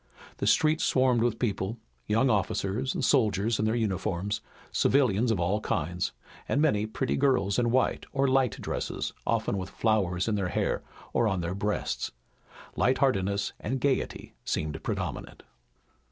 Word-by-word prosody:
The - - -1
streets 155 0 +3
swarmed 130 -3 +3
with 115 -1 +1
people, 105 -1 -1 0.3
young 115 +5 +3
officers 105 +3 0
and 130 - 0
soldiers 110 -4 +2
in 110 - +1
their 110 +1 +1
uniforms, 100 -2 -1 0.3
civilians 125 -4 +3
of 110 -5 +1
all 95 +5 +1
kinds, 90 +1 -1 0.4
and 140 - +2
many 110 -9 +2
pretty 130 +4 -1
girls 125 -8 +2
in 120 -1 +2
white 130 +2 +1
or 140 0 +2
light 130 -3 +2
dresses, - - -3
often 100 - +1
with 95 0 -5
flowers 95 -5 +1
in 110 - +1
their 100 -3 0
hair - - 0 0.3
or 120 - +3
on 95 -4 0
their 85 +1 -2
breasts. 105 +2 -2 0.7
Light 130 - +2
heartedness 100 -6 +1
and 130 - -2
gaiety 135 +1 -1
seemed 75 -2 -2
predominant. - - -4
110 Hz, 155 wpm, -28 LUFS, 95-130 Hz, 0.7 s, streets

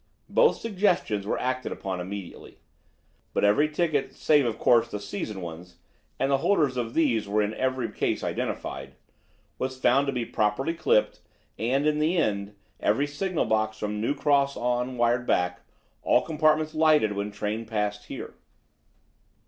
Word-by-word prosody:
Both 475 -2 +4
suggestions 185 - 0
were - - 0
acted 130 0 -2
upon 95 -2 -4
immediately. 95 0 -8 0.8
But - - +1
every 125 +10 +4
ticket, 155 -2 -1
save, 145 -4 +3
of 115 -1 -2
course, 115 -1 +4
the 105 - -4
season 100 0 -5
ones 85 +1 -9 0.4
and 135 +1 +1
the 135 - +3
holders 150 -7 +2
of 120 -2 -3
these 125 -10 +2
were 105 +1 +1
in 105 +1 -2
every 130 -1 -1
case - - -1
identified 65 0 -4 0.6
was 130 0 -3
found 135 +3 +3
to - - +1
be 125 -3 -2
properly 115 +10 0
clipped; 165 -10 +1 0.4
and, 130 +6 +1
in 150 0 +2
the 160 +4 +1
end, 100 -8 -1 0.2
every 120 +8 +2
signal 170 +4 -2
box 110 0 0
from 105 0 -3
New 120 +6 0
Cross 140 -1 +2
on 125 +1 -1
wired 120 +1 +1
back: 90 0 +1 0.4
"All - - +3
compartments 155 0 +1
lighted 155 -8 +4
when 100 0 -3
train 105 +2 -3
passed 105 -1 -2
here." - - -7
120 Hz, 155 wpm, -26 LUFS, 105-145 Hz, 0.8 s, Both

